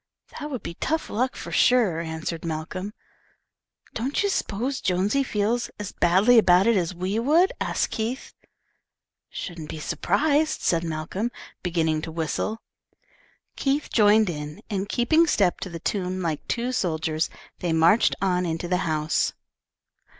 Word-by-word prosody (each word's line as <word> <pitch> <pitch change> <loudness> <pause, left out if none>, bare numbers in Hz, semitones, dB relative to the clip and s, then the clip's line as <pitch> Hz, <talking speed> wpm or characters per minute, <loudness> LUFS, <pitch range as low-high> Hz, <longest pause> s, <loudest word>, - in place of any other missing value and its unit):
"That 295 -1 -5
would 260 -5 -5
be - - -5
tough 315 - -2
luck, 255 +4 0
for - - -7
sure," 225 -10 +3
answered 160 0 -4
Malcolm. 165 +5 -4 1.0
"Don't 265 - -1
you 405 - +1
s'pose 260 - -2
Jonesy 190 +9 +1
feels 235 -1 0
as 205 -2 -5
badly 195 +8 +5
about 180 -2 +5
it 230 0 +4
as 180 -1 0
we 185 +5 -1
would?" 320 +10 +4
asked - - 0
Keith. 230 +4 -3 1.0
"Shouldn't 165 -4 -7
be 160 - -6
surprised," 285 - +1
said 165 -1 +1
Malcolm, 165 +7 -3 0.3
beginning 160 -3 0
to 160 - -6
whistle. 165 +7 -2 0.9
Keith 280 +2 -1
joined 215 -1 +5
in, 150 +5 -7
and 200 0 -2
keeping 315 +8 +3
step 195 - +2
to 185 - -5
the 170 - -6
tune, 185 0 -2
like 160 -3 -3
two 240 +2 -1
soldiers, 160 -8 -1 0.3
they 175 - -1
marched 165 +7 +4
on 180 -2 +2
into 165 0 -2
the 180 +1 +1
house. 155 0 0
190 Hz, 145 wpm, -25 LUFS, 165-235 Hz, 1.0 s, badly